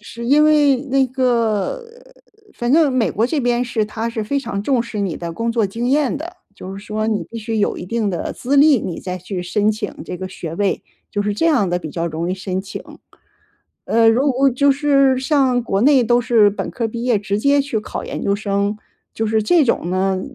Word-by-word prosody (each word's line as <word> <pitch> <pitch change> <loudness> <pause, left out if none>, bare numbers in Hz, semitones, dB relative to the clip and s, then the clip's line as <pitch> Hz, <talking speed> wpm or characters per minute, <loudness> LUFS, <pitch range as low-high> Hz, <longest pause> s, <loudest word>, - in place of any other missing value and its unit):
是 235 +3 -9
因 290 +4 +5
为 295 -3 +4
那 270 0 0
个 245 - 0 0.7
反 240 +2 -1
正 305 -4 +4
美 250 -3 +1
国 225 - +1
这 305 +4 -1
边 245 -1 +1
是， 230 -3 -1
它 225 +2 -4
是 225 -2 -4
非 280 +6 -1
常 200 -7 -4
重 255 -1 +1
视 225 -2 -7
你 190 -5 -2
的 170 -1 -5
工 230 +5 -2
作 230 -2 +1
经 230 +5 -3
验 285 +1 +1
的， 345 +5 -8 0.2
就 190 0 -8
是 200 - -10
说 215 +1 -2
你 215 -2 0
必 230 - -6
须 225 0 -3
有 205 - 0
一 180 - -7
定 220 -1 -1
的 175 - -3
资 275 +3 -1
历， 285 -3 +6
你 175 -3 -5
再 180 -1 -4
去 180 +1 -5
申 210 +4 +1
请 215 -1 -4
这 - - -6
个 185 +1 -6
学 165 -3 -7
位， 200 -1 0 0.3
就 205 - -1
是 205 0 -1
这 330 - +1
样 250 - +3
的 175 - 0
比 160 -3 -7
较 170 +2 -3
容 165 +2 -3
易 - - -1
申 185 0 -3
请。 195 - -8 1.0
呃， 230 0 +3
如 265 +5 +2
果 270 +2 +3
就 280 +3 +3
是 275 -2 +3
像 265 -3 +2
国 195 -4 -1
内， 275 -1 +5
都 240 +1 +3
是 230 -4 +4
本 200 - -4
科 230 -2 -2
毕 235 +1 -5
业 245 -4 +2
直 200 0 -2
接 280 +4 +3
去 270 -6 -2
考 - - -6
研 - - -5
究 200 0 +1
生， 200 0 -1 0.4
就 225 - -2
是 220 0 +1
这 325 +8 +4
种 200 -8 0
呢， 190 0 0
230 Hz, 245 characters per minute, -19 LUFS, 200-265 Hz, 1.0 s, 历